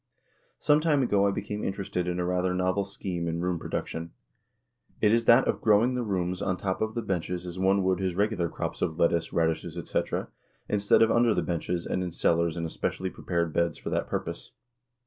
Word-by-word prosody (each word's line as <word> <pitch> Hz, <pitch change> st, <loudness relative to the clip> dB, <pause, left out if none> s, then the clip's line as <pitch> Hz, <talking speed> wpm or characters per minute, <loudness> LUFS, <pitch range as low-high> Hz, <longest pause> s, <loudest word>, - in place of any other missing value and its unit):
Some 150 Hz, 0 st, +4 dB
time 150 Hz, -4 st, +2 dB
ago 100 Hz, -4 st, +3 dB
I -, -, +3 dB
became 105 Hz, +1 st, -4 dB
interested 95 Hz, -2 st, -2 dB
in 90 Hz, 0 st, -1 dB
a 90 Hz, -, 0 dB
rather 90 Hz, 0 st, 0 dB
novel 95 Hz, +2 st, +1 dB
scheme 90 Hz, -3 st, -4 dB
in 85 Hz, 0 st, -2 dB
'room 90 Hz, -1 st, -1 dB
production: 85 Hz, +1 st, -4 dB, 0.9 s
It 105 Hz, 0 st, +4 dB
is 115 Hz, 0 st, +2 dB
that 120 Hz, +3 st, +6 dB
of -, -, 0 dB
growing 110 Hz, +4 st, +4 dB
the 125 Hz, -, -1 dB
'rooms 90 Hz, -4 st, -2 dB
on 95 Hz, -1 st, 0 dB
top 95 Hz, -1 st, -2 dB
of 110 Hz, +1 st, -1 dB
the 115 Hz, -, -2 dB
benches 90 Hz, -1 st, -2 dB
as 90 Hz, +1 st, -6 dB
one 95 Hz, +1 st, +3 dB
would 95 Hz, -1 st, +1 dB
his 95 Hz, -2 st, -1 dB
regular 100 Hz, -4 st, +1 dB
crops -, -, -4 dB
of 80 Hz, -, -1 dB
lettuce, 85 Hz, -1 st, +2 dB
raddishes, 80 Hz, 0 st, 0 dB
etc., 85 Hz, -, -2 dB, 0.4 s
instead 100 Hz, +1 st, +4 dB
of 115 Hz, -, +3 dB
under 115 Hz, -2 st, +4 dB
the -, -, +1 dB
benches 85 Hz, 0 st, -2 dB
and 95 Hz, -, -1 dB
in 90 Hz, -, -2 dB
cellars 85 Hz, 0 st, +1 dB
in 85 Hz, -, -2 dB
especially 90 Hz, +3 st, -3 dB
prepared 85 Hz, -3 st, -2 dB
beds 85 Hz, -2 st, +1 dB
for -, -, -6 dB
that -, -, -1 dB
purpose. -, -, -5 dB
90 Hz, 205 wpm, -28 LUFS, 85-105 Hz, 0.9 s, that